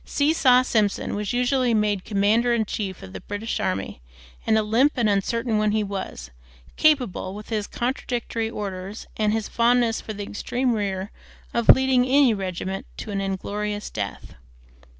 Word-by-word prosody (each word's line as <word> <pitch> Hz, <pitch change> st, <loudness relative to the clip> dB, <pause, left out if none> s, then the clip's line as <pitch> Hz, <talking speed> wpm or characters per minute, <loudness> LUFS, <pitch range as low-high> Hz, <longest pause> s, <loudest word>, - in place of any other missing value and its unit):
Seesaw 285 Hz, -4 st, +3 dB
Simpson 215 Hz, -5 st, 0 dB
was 205 Hz, -1 st, -2 dB
usually 250 Hz, -1 st, +2 dB
made 210 Hz, -3 st, 0 dB
commander 220 Hz, +4 st, +2 dB
in 220 Hz, -2 st, +1 dB
chief 195 Hz, -3 st, -4 dB
of 95 Hz, -, -10 dB
the -, -, -7 dB
British 210 Hz, +2 st, -4 dB
army, 95 Hz, -9 st, -3 dB, 0.5 s
and 220 Hz, -, +4 dB
a 220 Hz, -, +2 dB
limp 235 Hz, +8 st, +3 dB
and 240 Hz, -4 st, +2 dB
uncertain 220 Hz, +3 st, 0 dB
one 210 Hz, 0 st, +1 dB
he 215 Hz, 0 st, +1 dB
was, 190 Hz, -, -6 dB, 0.4 s
capable, 250 Hz, -11 st, +2 dB
with 210 Hz, +1 st, -9 dB
his 215 Hz, -3 st, -2 dB
contradictory 240 Hz, -2 st, -2 dB
orders 200 Hz, -1 st, -6 dB
and 215 Hz, -1 st, +2 dB
his 220 Hz, -1 st, -1 dB
fondness 235 Hz, -1 st, +2 dB
for 215 Hz, -, -6 dB
the 205 Hz, 0 st, -5 dB
extreme 245 Hz, +5 st, -1 dB
rear, 200 Hz, -2 st, -2 dB, 0.4 s
of 235 Hz, -1 st, -1 dB
leading 265 Hz, -1 st, +6 dB
any 265 Hz, -2 st, +4 dB
regiment 190 Hz, -1 st, -4 dB
to 215 Hz, -, -6 dB
an 195 Hz, -1 st, -1 dB
inglorious 205 Hz, +2 st, -3 dB
death. 100 Hz, -2 st, -5 dB
215 Hz, 160 wpm, -24 LUFS, 200-240 Hz, 0.5 s, leading